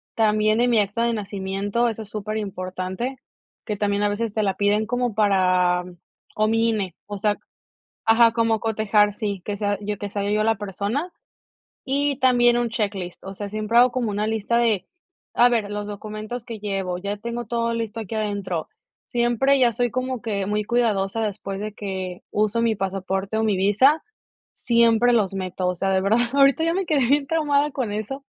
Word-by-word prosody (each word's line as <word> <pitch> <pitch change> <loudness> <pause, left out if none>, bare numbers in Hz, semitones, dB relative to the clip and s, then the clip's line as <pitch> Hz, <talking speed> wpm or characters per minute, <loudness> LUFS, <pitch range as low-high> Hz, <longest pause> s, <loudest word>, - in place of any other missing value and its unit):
También, 215 0 +2
en 245 - +3
mi 230 - +4
acta 210 +3 0
de 235 - +1
nacimiento, 200 +2 -1
eso 220 0 -5
es 205 - -14
súper 215 0 -4
importante, 190 +4 -4 0.5
que 210 -2 -3
también, 205 0 0
a 205 - +3
veces 215 +1 -2
te 215 - 0
la 195 -2 0
piden, 205 +2 +2
como 245 -1 -1
para 185 -4 +3 0.5
o 215 0 +2
mi 225 +1 +2
INE, 195 -6 -2
o 205 -1 -5
sea 210 0 +1 0.7
ajá, 225 +1 +6
como 225 -1 +2
cotejar, 210 -2 +2
sí, 205 -4 -3
que 205 -1 -3
sea 205 -1 0
yo 205 0 -3
que 205 +1 -5
sea 200 0 -2
yo 215 0 +2
la 225 +1 +2
persona. 205 - -3 0.7
Y 280 0 0
también 240 -2 +4
un 240 -1 0
checklist, 200 -5 -3
o 195 0 -7
sea, 205 +1 -6
siempre 215 +2 +1
hago 250 +1 +6
como 240 -4 -1
una 210 +1 -1
lista 220 +1 0
de: 220 -6 +1 0.5
"A 240 - +6
ver, 220 -4 0
los 205 0 -4
documentos 215 +3 -6
que 230 -2 -7
llevo. 195 -3 -2
Ya 200 +2 -3
tengo 235 +2 -5
todo 230 +1 -1
listo, 230 -1 -3
aquí 220 0 -6
adentro". 200 -6 -2 0.4
Siempre, 240 +3 +2
ya 240 -2 +4
soy 245 +2 0
como 255 -1 -3
que 200 -4 -2
muy 210 +1 0
cuidadosa, 225 -3 0
después 195 -2 -4
de 210 0 -5
que 190 -3 -5
uso 215 +2 +1
mi 225 -2 +1
pasaporte, 195 +1 -2
o - - +1
mi 210 -3 +2
visa, 215 +11 +4 0.5
siempre 235 0 +3
los 205 -5 +2
meto. 185 -1 -3
O 180 - 0
sea, 195 +2 0
de 190 0 +2
verdad, 210 +5 +2
ahorita, 275 +3 +4
ya 330 - +1
me 380 0 -1
quedé 285 -6 +2
bien 280 +1 +3
traumada, 295 -2 +1
con 250 -6 -2
eso. 245 +7 -5
215 Hz, 190 wpm, -23 LUFS, 200-235 Hz, 0.7 s, ajá